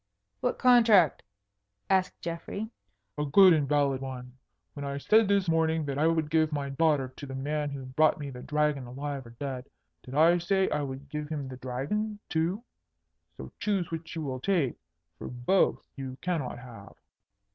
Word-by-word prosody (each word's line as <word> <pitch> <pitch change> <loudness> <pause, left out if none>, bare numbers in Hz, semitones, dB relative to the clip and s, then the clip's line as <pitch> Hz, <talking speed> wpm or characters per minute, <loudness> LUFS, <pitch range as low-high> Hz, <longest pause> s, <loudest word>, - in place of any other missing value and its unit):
"What - - -1
contract?" 230 - +5 0.7
asked 190 -1 +1
Geoffrey. 185 +6 -5 0.5
"A - - +1
good 185 +5 +7
and 150 -4 +1
valid 140 -3 +2
one. 125 -1 -7 0.4
When 145 - -7
I 140 0 -3
said 215 +9 +4
this 200 -2 +2
morning 160 -1 +2
that 140 0 -3
I 155 - +4
would 160 -2 0
give 160 -1 +3
my 145 -2 -2
daughter 140 -2 +1
to 145 - -8
the 135 - -6
man 145 +2 -2
who 140 -2 -6
brought 150 +4 +3
me 145 -2 -6
the 125 -1 -9
Dragon 150 -2 0
alive 135 0 -5
or 115 - -14
dead, 135 -2 -5 0.3
did 130 - -9
I 165 +3 +5
say 190 +2 +1
I 150 - 0
would 135 0 -6
give 150 +1 -5
him 145 -4 -4
the 130 - -8
Dragon 140 - -3
too? 175 +7 0 0.7
So - - -8
choose 195 -6 -1
which 165 0 -6
you 160 - -3
will 130 -3 -3
take, 155 -4 +1 0.5
for - - -6
both 125 +11 +1
you 130 -2 -6
cannot 165 -10 -2
have." 115 -5 -12
150 Hz, 180 wpm, -29 LUFS, 135-170 Hz, 0.7 s, good